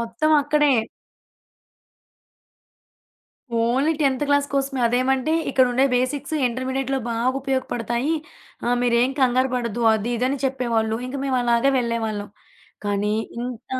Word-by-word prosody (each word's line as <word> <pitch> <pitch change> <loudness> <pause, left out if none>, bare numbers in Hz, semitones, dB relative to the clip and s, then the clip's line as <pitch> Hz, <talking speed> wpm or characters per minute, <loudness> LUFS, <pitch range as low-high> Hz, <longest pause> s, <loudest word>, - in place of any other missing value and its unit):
మొత్తం 235 +7 -1
అక్కడే. 295 0 +3 2.8
ఓన్లీ 255 +7 +2
10థ్ 275 -2 +1
క్లాస్ 285 0 +3
కోసమే. 270 -1 -1
అదేమంటే 260 +4 +1 0.2
ఇక్కడుండే 255 0 +3
బేసిక్స్ 270 +4 -1
ఇంటర్మీడియేట్‌లో 260 +2 -2
బాగా 230 +2 0
ఉపయోగపడతాయి. 260 0 -1 0.5
ఆహ్, 245 +1 +2
మీరేం 245 +2 +2
కంగారుపడద్దు 245 -2 +1
అది, 220 +2 -2
ఇదిని 255 +4 0
చెప్పేవాళ్ళు. 235 -4 0
ఇంక 260 - -5
మేము 260 -2 +1
అలాగే 240 +3 +3
వెళ్ళేవాళ్ళం. 225 -3 -2 0.6
కానీ 205 +1 0 0.2
ఇంత 245 -1 -6
250 Hz, 105 wpm, -22 LUFS, 235-270 Hz, 2.8 s, అక్కడే